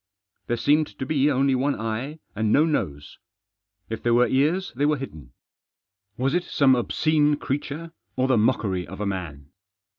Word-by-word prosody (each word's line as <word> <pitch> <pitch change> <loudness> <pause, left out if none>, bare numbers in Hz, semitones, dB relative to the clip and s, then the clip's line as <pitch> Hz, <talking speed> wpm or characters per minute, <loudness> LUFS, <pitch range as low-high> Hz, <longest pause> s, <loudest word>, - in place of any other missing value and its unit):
There 120 - 0
seemed 150 +5 +3
to 130 - -3
be 145 0 +2
only 135 -1 +2
one 135 +3 0
eye 115 +7 -3 0.2
and 110 0 0
no 150 +6 +5
nose. 75 - -3 0.7
If 110 0 -5
there 120 0 +2
were 125 +1 +5
ears 160 +8 +1
they 145 +3 +1
were 150 -1 +2
hidden. 80 - -9 0.9
Was 135 +3 0
it 175 0 +1
some 140 -6 +3
obscene 150 +4 +2
creature 145 +3 -4 0.2
or 130 0 +1
the 130 - +3
mockery 105 -5 +1
of - - -9
a 105 - -2
man 80 -8 -5
130 Hz, 170 wpm, -24 LUFS, 110-145 Hz, 0.9 s, no